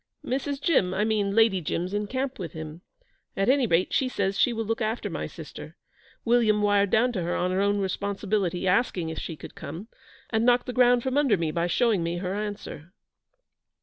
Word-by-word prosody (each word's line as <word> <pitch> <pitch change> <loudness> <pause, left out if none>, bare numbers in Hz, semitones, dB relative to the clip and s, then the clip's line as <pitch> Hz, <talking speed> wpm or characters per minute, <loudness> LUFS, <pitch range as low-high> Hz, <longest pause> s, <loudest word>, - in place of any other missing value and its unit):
'Mrs. 275 +2 -2
Jim 195 - +2
I 210 - +1
mean 205 -2 0
Lady 225 -5 +4
Jim's 175 +4 -3
in 205 0 -1
camp 260 +2 -3
with 175 -3 -6
him. 160 +1 -8 0.6
At 195 +3 +2
any 265 -2 +3
rate, 170 -1 +1
she 265 - +2
says 195 -5 -1
she 245 - +3
will 225 -1 -3
look 225 +2 -2
after 220 +2 -2
my - - -3
sister. - - -10 0.5
William 225 -3 +3
wired 205 -1 +3
down 240 +5 +3
to 200 -7 -3
her 175 +1 -1
on 180 +1 0
her 185 +1 +1
own 205 0 +2
responsibility, 195 -1 -1
asking 180 -4 +1
if 160 - -5
she 165 - -5
could - - -11
come, 170 +9 -8 0.4
and 220 -1 +1
knocked 245 0 +4
the 250 - -5
ground 245 -1 +4
from 265 +2 +1
under 265 -9 +3
me 165 -2 -1
by 170 +1 0
showing 215 +1 +2
me 170 +1 -2
her 180 +1 -3
answer.' 205 -5 -6
205 Hz, 205 wpm, -26 LUFS, 180-240 Hz, 0.6 s, Lady